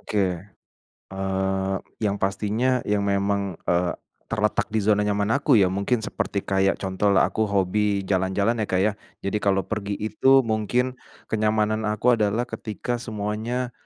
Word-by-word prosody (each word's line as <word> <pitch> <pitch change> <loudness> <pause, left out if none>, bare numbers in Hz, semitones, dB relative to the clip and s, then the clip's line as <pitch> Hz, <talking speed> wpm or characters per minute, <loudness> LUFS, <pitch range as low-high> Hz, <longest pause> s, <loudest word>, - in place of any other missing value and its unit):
Oke, 105 - -3 0.9
eee, 95 0 -1 0.3
yang 100 -1 +1
pastinya 110 +6 0
yang 105 0 +1
memang, 100 -2 0
eee, 85 0 +1 0.3
terletak 105 0 0
di 110 -1 -1
zona 105 0 +3
nyaman 105 +1 0
aku 140 - +4
ya, 95 -4 +4
mungkin 105 +4 0
seperti 100 -1 -3
kayak 95 0 +2
contohlah 95 +1 +2
aku 110 0 0
hobi 100 +1 +1
jalan-jalan 95 +4 0
ya, 105 - -1
Kak, 95 0 +1
ya. 105 - +3 0.3
Jadi 100 +2 -1
kalau 95 -2 +1
pergi 100 -1 -3
itu 120 +6 +3
mungkin 120 +3 -1 0.3
kenyamanan 110 0 +1
aku 115 +3 +2
adalah 105 +3 +1
ketika 120 +1 -4
semuanya, 110 +3 -3
105 Hz, 145 wpm, -24 LUFS, 100-110 Hz, 0.9 s, aku